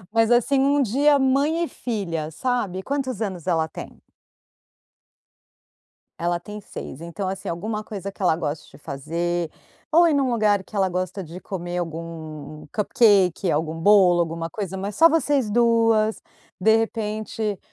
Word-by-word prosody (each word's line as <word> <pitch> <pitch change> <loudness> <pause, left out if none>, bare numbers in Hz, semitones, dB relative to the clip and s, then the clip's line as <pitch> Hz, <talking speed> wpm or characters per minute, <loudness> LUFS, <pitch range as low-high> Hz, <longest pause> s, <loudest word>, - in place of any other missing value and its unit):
mas 225 -1 +3
assim, 245 +3 +3
um 280 +1 +3
dia 280 +5 +3
mãe 280 +6 +2
e - - -4
filha, 170 -10 -4
sabe? 205 -2 -2
Quantos 260 -2 -2
anos 185 -6 -4
ela 160 -3 +1
tem? - - -10 2.2
Ela 175 +1 0
tem 210 +4 -8
6. 150 -7 -8
Então 170 +3 -4
assim, 190 +1 -5
alguma 210 +6 -3
coisa 200 -2 -6
que - - -10
ela 170 -3 +3
goste 150 -2 -4
de 140 - -16
fazer, 165 +4 -3 0.4
ou 340 +2 +6
ir 320 - +3
em 285 - +3
um 260 -2 +1
lugar 210 -4 +2
que 210 - -11
ela 190 -1 +3
gosta 185 +2 -3
de 170 +3 -9
comer 175 -2 -5
algum 160 -3 -7
cupcake, 200 -4 +3
algum 160 +1 -1
bolo, 185 -2 +5
alguma 165 0 -2
coisa, 195 -2 -5
mas 200 +2 -4
só 330 - +8
vocês 290 -7 +1
2. 225 -1 +3 0.4
De 220 +4 +5
repente 215 -2 -2
200 Hz, 155 wpm, -23 LUFS, 170-230 Hz, 2.2 s, só